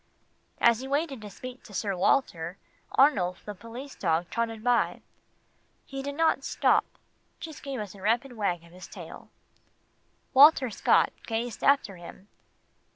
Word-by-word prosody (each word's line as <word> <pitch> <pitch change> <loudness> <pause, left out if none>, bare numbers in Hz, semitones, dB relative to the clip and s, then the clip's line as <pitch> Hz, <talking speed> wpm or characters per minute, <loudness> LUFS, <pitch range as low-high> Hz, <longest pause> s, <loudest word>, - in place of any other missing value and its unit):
As 235 -1 +5
he 265 - -6
waited 280 -3 -1
to 210 - -8
speak 250 +5 -9
to 205 - -13
Sir 195 0 -1
Walter, 180 -4 +1 0.4
Arnulf 190 -11 +3
the 210 - -5
police 230 +7 -9
dog 170 -1 -1
trotted 225 -2 -2
by. 245 -1 +1 0.8
He 270 0 -6
did 285 +1 -5
not 325 +1 +2
stop - - +2 0.5
just 315 -3 -8
gave 275 -3 -5
us 205 -3 -6
a 195 - -14
rapid 235 +5 0
wag 180 -6 -1
of 170 - -17
his 180 +1 -11
tail. - - -11 1.0
Walter 270 -2 +7
Scott - - +3
gazed 230 0 -3
after 270 -9 +3
him. 175 +3 -12
230 Hz, 150 wpm, -28 LUFS, 195-270 Hz, 1.0 s, Walter